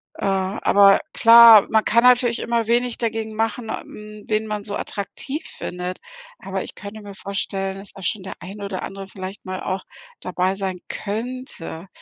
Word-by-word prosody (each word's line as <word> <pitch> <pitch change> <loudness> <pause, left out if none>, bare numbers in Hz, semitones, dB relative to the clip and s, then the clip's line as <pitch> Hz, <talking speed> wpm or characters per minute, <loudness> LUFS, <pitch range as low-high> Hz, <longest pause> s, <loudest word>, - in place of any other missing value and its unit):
Äh, - - -5
aber 195 +1 +4
klar, 230 -2 +9
man 220 -1 +3
kann 235 +2 +3
natürlich 245 -1 +4
immer 230 -2 -1
wenig 240 +1 +1
dagegen 225 -1 -2
machen, 225 +1 -2
äh - - -3
hm, 210 0 -11
wen 215 0 0
man 210 -1 -3
so 205 -1 -4
attraktiv 210 +9 -4
findet, 180 +1 -6 0.4
aber - - -4
ich - - -8
könnte 210 +1 -9
mir 200 -1 -10
vorstellen, 195 0 -3
dass 195 +1 -8
da 195 - -13
schon 185 +2 -1
der 190 - -6
ein 200 +2 -9
oder 195 -2 -4
andere 195 0 -7
vielleicht 190 +1 -8
mal 185 0 -5
auch 190 +1 -3 0.4
dabei 185 +1 -1
sein 190 -2 -3
könnte. 215 -5 -5
205 Hz, 175 wpm, -22 LUFS, 195-225 Hz, 0.4 s, klar